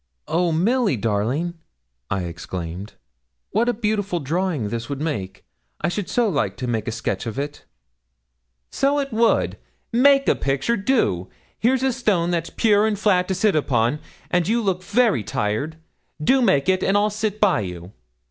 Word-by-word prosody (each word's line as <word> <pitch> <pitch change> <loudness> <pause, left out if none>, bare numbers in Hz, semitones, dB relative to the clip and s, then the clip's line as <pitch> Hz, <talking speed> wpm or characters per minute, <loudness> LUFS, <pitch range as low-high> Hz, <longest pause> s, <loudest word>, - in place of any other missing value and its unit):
'Oh, 170 +1 +1
Milly 205 - +2
darling!' 115 +11 -1 0.6
I 95 -2 -1
exclaimed, 85 +2 -6 0.6
'what 230 +4 +2
a - - +4
beautiful 205 -5 -1
drawing 160 - -1
this 115 +3 -4
would 140 -1 -3
make! 100 -12 -4 0.3
I - - 0
should 195 +1 -3
so 240 -2 +2
like 155 -9 -1
to 125 - -4
make 115 -3 -2
a - - 0
sketch 110 -1 -3
of 115 - -5
it.' 145 +1 -5 1.1
'So 280 +1 +1
it 275 -3 -2
would. 230 +1 +2 0.3
Make 275 +3 +5
a - - +5
picture 140 - 0
do! 195 - 0 0.3
here's 255 +3 +2
a 265 -1 +2
stone 200 -8 +1
that's 170 -1 -1
pure 215 -2 +3
and 215 -2 -1
flat 190 -3 +2
to 190 - -1
sit 200 +1 +2
upon, 130 -2 +1 0.3
and 175 -1 +2
you 230 +2 +1
look 185 -3 0
very 215 - +2
tired. 110 +12 -2 0.4
Do 260 - +3
make 190 - +3
it, 190 0 +2
and 195 - +2
I'll 210 +1 +2
sit 215 0 -2
by 205 - +3
you.' 90 -2 -6
175 Hz, 170 wpm, -22 LUFS, -, 1.1 s, Make